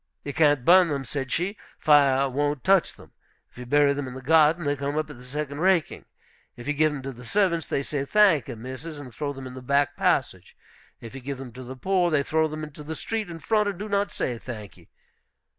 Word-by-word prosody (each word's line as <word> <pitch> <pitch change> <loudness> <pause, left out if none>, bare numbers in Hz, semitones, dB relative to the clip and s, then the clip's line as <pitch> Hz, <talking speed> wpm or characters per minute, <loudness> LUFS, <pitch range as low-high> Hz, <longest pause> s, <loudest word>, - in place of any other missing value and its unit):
"You 145 - -5
can't 145 -5 +3
burn 180 +1 +7
them," 140 -2 -2
said 135 +1 -4
she; 190 +5 -2 0.2
"fire 140 -3 +4
won't 145 +1 -1
touch 190 -2 +3
them. - - -17 0.4
If - - -15
you 125 - -8
bury 145 +1 +4
them 140 -1 -4
in 130 - -8
the 130 - -7
garden, 160 +3 +4
they 145 0 +1
come 140 +1 -3
up 155 -1 -2
at 140 - -11
the - - -13
second 140 +2 -5
raking. 185 -2 +1 0.5
If 120 - -10
you 150 - +1
give 155 +1 +2
them 140 -3 -6
to 135 - -4
the 125 -1 -12
servants, 170 - +1
they 140 - -1
say, 140 -1 -3
'Thank 170 - +3
e, 120 - -5
missus,' 130 +7 -8
and 130 -4 -10
throw 145 +5 -3
them 135 -1 -8
in 130 - -8
the 130 - -9
back 140 +1 +1
passage. - - -1 0.4
If 115 - -10
you 135 - -8
give 140 +1 -5
them 130 -2 -8
to 130 +1 -9
the 130 +2 -8
poor, 180 +4 +1
they 150 -3 +2
throw 160 +2 +1
them 155 0 -6
into 150 0 -9
the 160 +2 -5
street 220 +3 -3
in 170 - -7
front, 210 +6 +1
and 195 - -5
do 210 +3 -5
not 200 0 0
say, 120 -2 -3
'Thank 110 -6 -9
e.' - - -21
145 Hz, 245 wpm, -25 LUFS, 130-165 Hz, 0.5 s, burn